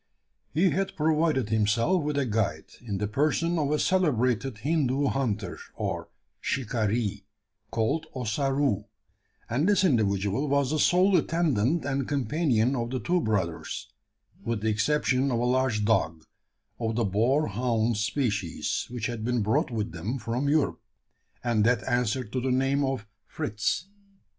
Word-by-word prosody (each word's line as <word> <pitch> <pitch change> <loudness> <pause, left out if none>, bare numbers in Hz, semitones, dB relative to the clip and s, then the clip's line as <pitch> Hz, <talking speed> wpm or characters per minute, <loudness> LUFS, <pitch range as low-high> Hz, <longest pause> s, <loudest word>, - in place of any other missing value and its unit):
He 175 +5 +3
had 195 +1 -1
provided 155 -6 +1
himself 115 - +2
with 150 -1 -2
a 140 - +2
guide, 105 -9 -1 0.2
in 105 -5 -4
the 105 +2 -1
person 155 +8 +1
of 145 -2 0
a 150 - +2
celebrated 130 - +1
Hindoo 140 -2 +1
hunter 110 -8 -2 0.2
or - - -3 0.3
"shikaree," 110 -4 -1 0.4
called 115 +9 0
Ossaroo; 130 -2 0 0.6
and 140 - +1
this 200 -2 +4
individual 105 - +1
was 140 -1 +2
the 155 - 0
sole 185 +5 +4
attendant 155 -3 +1
and 135 -2 -1
companion 140 -3 +1
of 120 -2 -2
the 130 0 -2
two 175 +4 +1
brothers 95 - -2 0.5
with 115 -3 -2
the 110 - +1
exception 130 +4 +1
of 120 - +1
a 120 - 0
large 125 -4 +1
dog, 80 -7 +1 0.6
of 115 -1 -1
the 115 -1 +1
boar 120 +10 +2
hound 115 +1 0
species, 105 - -1
which 120 -3 -4
had 115 -2 -3
been 120 -1 0
brought 110 +2 +1
with 110 -5 -3
them 95 +10 -3
from 120 +4 -2
Europe, 150 -1 +1 0.6
and 115 -3 +2
that 115 -1 +2
answered 120 -1 0
to 130 - 0
the 130 - -1
name 135 +2 +2
of 135 -5 -2 0.2
Fritz. 105 - -2
125 Hz, 150 wpm, -27 LUFS, 110-145 Hz, 0.6 s, this